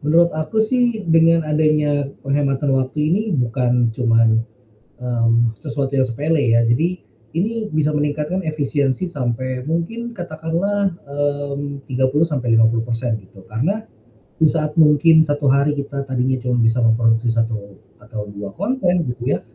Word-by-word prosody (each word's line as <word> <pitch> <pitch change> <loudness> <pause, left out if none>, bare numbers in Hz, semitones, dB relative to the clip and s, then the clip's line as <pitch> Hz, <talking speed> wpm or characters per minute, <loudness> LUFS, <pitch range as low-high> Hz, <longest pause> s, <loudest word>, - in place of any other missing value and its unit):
Menurut 165 +3 +3
aku 155 +8 0
sih 240 -2 0
dengan 165 0 +4
adanya 150 -2 +1 0.2
penghematan 140 0 0
waktu 135 +3 0
ini 205 - +2
bukan 125 -1 +1
cuman, 115 -1 +3 0.6
mmm, 115 -2 0
sesuatu 140 -3 -3
yang 130 -2 +2
sepele 145 +6 0 0.2
ya, 115 - +3
jadi 120 +9 +2 0.5
ini 215 +4 -1
bisa 155 -2 0
meningkatkan 150 +4 -1
efisiensi 145 -2 -1
sampai 130 -1 -3
mungkin 225 +9 -3
katakanlah, 175 +4 -1 0.2
mmm, 145 0 -3
30-50% 120 -4 +1
gitu 95 0 -18
karena, 155 - -2 0.5
di 160 - +1
saat 155 0 +1
mungkin 160 +1 +5
1 145 -2 0
hari 140 +2 +3
kita 140 -1 -4
tadinya 130 -1 0
cuma 125 -1 +1
bisa 115 +1 +2
memproduksi 115 +1 +2
1 110 -4 -3 0.2
atau 105 -4 -7
2 100 -1 -8
konten 180 - 0
gitu 120 +2 -2
ya, - - -1
140 Hz, 130 wpm, -20 LUFS, 120-160 Hz, 0.6 s, mungkin